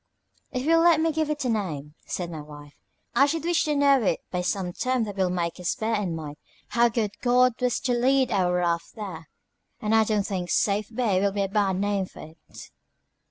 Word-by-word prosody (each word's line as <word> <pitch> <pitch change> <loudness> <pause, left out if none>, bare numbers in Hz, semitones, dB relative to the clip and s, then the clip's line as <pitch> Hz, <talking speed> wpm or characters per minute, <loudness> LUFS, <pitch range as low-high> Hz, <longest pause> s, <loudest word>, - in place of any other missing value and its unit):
"If 255 - -3
you 330 +3 +4
will - - +4
let 335 -2 +5
me 325 0 +2
give 315 0 -1
it 295 -3 -2
a - - +1
name," 155 -10 -3
said 175 -2 -4
my 155 -2 -6
wife, 145 -1 -12 0.4
"I 275 - +5
should 320 +2 -2
wish 345 0 +1
to 300 -1 0
know 280 -2 +4
it 205 - 0
by 180 - -1
some 180 0 -2
term 255 +2 0
that 205 -2 -5
will 190 -2 +1
make 175 -1 -2
us 180 - -1
bear 220 +1 -2
in 200 -6 -1
mind 150 -2 -7 0.3
how 235 0 +3
good 220 -3 -1
God 250 0 +4
was 250 -2 +1
to 255 -2 0
lead 260 +1 +2
our 185 -4 +2
raft 170 -1 -1
there, 180 -7 -7 0.5
and 215 -2 -1
I 220 0 +6
don't 210 -2 0
think 185 -4 -3
Safe 205 0 +1
Bay 220 -6 +1
will 200 0 +2
be 200 0 -1
a - - 0
bad 195 -1 +1
name 200 0 0
for - - -13
it." 160 -1 -14
210 Hz, 225 wpm, -25 LUFS, 180-250 Hz, 0.5 s, I